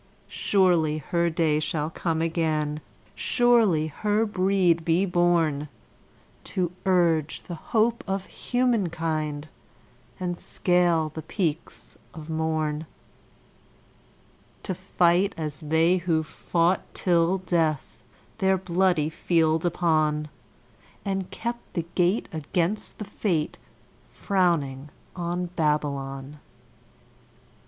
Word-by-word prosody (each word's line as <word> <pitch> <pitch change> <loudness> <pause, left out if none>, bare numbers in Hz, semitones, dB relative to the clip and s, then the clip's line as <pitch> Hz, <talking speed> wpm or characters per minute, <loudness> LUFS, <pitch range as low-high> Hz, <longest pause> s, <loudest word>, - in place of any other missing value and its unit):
Surely 175 -6 +2
her 170 +3 0
day 160 -2 +1
shall 155 0 -2
come 165 -1 -1
again, 155 -2 -1 0.3
surely 230 - +3
her 210 +8 0
breed 185 -4 +2
be 170 +4 +2
born 170 -5 +1 0.8
To 180 -2 -1 0.2
urge 165 -4 +2
the 175 - -7
hope 225 +7 0
of 195 0 -2
humankind 165 - -1 0.7
and 175 -1 -3
scale 175 -3 +2
the 160 - -5
peaks 165 -3 -4 0.2
of 160 0 -8
morn 160 -1 -1 1.8
To 185 - -2
fight 185 +2 +2
as 155 -2 -4
they 160 +3 +3
who 165 -3 0
fought 170 +3 0
till 175 0 +2
death 165 -5 -1 0.4
their 190 -1 +3
bloody 180 -3 +1
field 160 0 +2
upon, 155 -3 +1 0.8
And 195 -2 -2
kept 235 +1 -6
the 170 - -1
gate 180 +4 +2
against 170 +6 -2
the 210 - -5
Fate 175 -6 -2 0.5
frowning 150 -8 0 0.3
on 175 0 -2
Babylon. 145 -2 -1
170 Hz, 100 wpm, -26 LUFS, 155-185 Hz, 1.8 s, surely